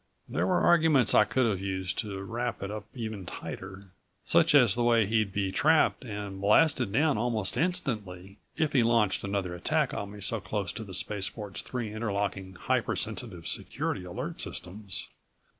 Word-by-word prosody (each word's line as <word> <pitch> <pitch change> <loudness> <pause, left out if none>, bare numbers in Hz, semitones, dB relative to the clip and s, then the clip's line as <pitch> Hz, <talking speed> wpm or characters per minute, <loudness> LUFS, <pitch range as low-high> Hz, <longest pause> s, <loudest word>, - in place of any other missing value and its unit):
There - - -1
were 180 -1 +2
arguments 160 -8 +4
I 105 - +6
could 120 +4 +1
have 100 -5 0
used 95 -1 -2
to 100 -3 -3
wrap 120 +2 -3
it 100 - -4
up 105 -1 -6
even 110 -6 -5
tighter 95 +1 -8 0.3
such - - +4
as 125 -8 +7
the 120 - 0
way 115 -2 +4
he'd 110 -1 +1
be 100 -1 -1
trapped 155 +8 +3
and 105 -4 -6
blasted 125 +2 +4
down 145 +2 +2
almost 110 -4 0
instantly 110 - -2 0.2
if 155 -2 0
he 130 - +5
launched 115 -3 +2
another 100 -3 -2
attack 145 - 0
on 100 - -4
me 105 0 -10
so 105 +3 0
close 100 +1 -3
to 115 - -6
the 95 -3 -7
spaceport's 100 0 -2
three 115 -4 -5
interlocking, 100 -3 -3
hyper - - 0
sensitive 85 -2 -4
security - - -3
alert 90 -1 -5
systems. 95 +1 -3
105 Hz, 170 wpm, -29 LUFS, 95-120 Hz, 0.3 s, as